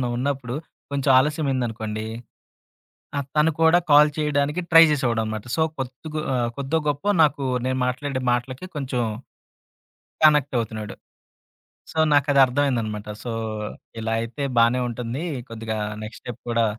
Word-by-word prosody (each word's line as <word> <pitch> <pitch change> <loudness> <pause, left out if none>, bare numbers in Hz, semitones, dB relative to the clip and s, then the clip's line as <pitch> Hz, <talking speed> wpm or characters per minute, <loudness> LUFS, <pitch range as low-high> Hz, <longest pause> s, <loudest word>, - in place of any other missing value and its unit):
ఏదన్నా 125 - 0
ఉన్నప్పుడు 130 -1 -2 0.4
కొంచెం 140 -1 +1
ఆలస్యమైందనుకోండి. 125 -7 -1 1.1
ఆ! - - +2 0.2
తను 150 +2 +4
కూడా 160 +2 +6
కాల్ 150 +1 +8
చేయడానికి 150 +2 0
ట్రై 165 -1 +9
జేసేవాడనమాట. 110 -6 -1
సో, 160 - 0 0.2
కోద్దుగో 135 +4 -5
ఆహ్, 120 -2 0
కోద్దో, 140 +3 -1
గొప్పో 145 +7 0
నాకు, 145 -1 +1 0.2
నేను 130 0 0
మాట్లాడే 130 +1 -2
మాటలకి 125 +6 -2
కొంచెం, 135 -3 -2 1.2
కనెక్టవుతున్నాడు. 120 -8 +2 1.0
సో, 160 - -5
నాకు 145 0 +4
అదర్థమైందనమాట. 125 -6 +2 0.2
సో, 120 - -4 0.7
ఇలాయితే 115 +5 -2
బానే 115 +2 +4
ఉంటుంది. 120 +6 -4 0.3
కొద్దిగా 110 -1 -4 0.3
నెక్స్ట్ 110 +1 -9
స్టెప్ 120 - -7
కూడా, 115 0 +2
130 Hz, 120 wpm, -23 LUFS, 115-145 Hz, 1.2 s, ట్రై